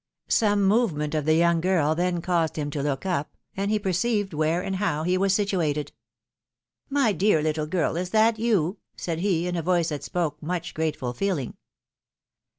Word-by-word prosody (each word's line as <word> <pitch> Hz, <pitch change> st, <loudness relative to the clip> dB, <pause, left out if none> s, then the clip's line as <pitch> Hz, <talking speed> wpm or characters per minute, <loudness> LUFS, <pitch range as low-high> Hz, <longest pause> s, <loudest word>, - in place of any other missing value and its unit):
Some 205 Hz, -2 st, +3 dB
movement 190 Hz, -8 st, +1 dB
of 155 Hz, -2 st, -1 dB
the 155 Hz, 0 st, +4 dB
young 170 Hz, 0 st, +3 dB
girl 165 Hz, -4 st, +2 dB
then 175 Hz, 0 st, -1 dB
caused 170 Hz, -3 st, 0 dB
him 145 Hz, -2 st, -3 dB
to 145 Hz, -, -3 dB
look 140 Hz, +3 st, -2 dB
up, 170 Hz, -6 st, -2 dB, 0.2 s
and 195 Hz, +1 st, -1 dB
he 215 Hz, -, +2 dB
perceived 205 Hz, 0 st, 0 dB
where 160 Hz, +3 st, 0 dB
and 190 Hz, -, -2 dB
how 155 Hz, -6 st, -1 dB
he 180 Hz, +2 st, +1 dB
was 195 Hz, +1 st, +2 dB
situated. 170 Hz, -8 st, 0 dB, 0.5 s
" 120 Hz, 0 st, -54 dB
My 235 Hz, -6 st, +4 dB
dear 190 Hz, -1 st, +3 dB
little 155 Hz, -1 st, -1 dB
girl, 165 Hz, 0 st, 0 dB
is 180 Hz, +1 st, -2 dB
that 220 Hz, +2 st, +3 dB
you? 205 Hz, -5 st, +1 dB
" -, -, -52 dB
said 165 Hz, -2 st, -3 dB
he, 175 Hz, -3 st, +1 dB
in 180 Hz, 0 st, -2 dB
a 170 Hz, -, -1 dB
voice 170 Hz, 0 st, +1 dB
that 150 Hz, -2 st, -4 dB
spoke 160 Hz, -4 st, -2 dB
much 170 Hz, 0 st, -3 dB
grateful 150 Hz, -6 st, -2 dB
feeling. 165 Hz, -3 st, -2 dB
170 Hz, 190 wpm, -25 LUFS, 155-195 Hz, 0.5 s, the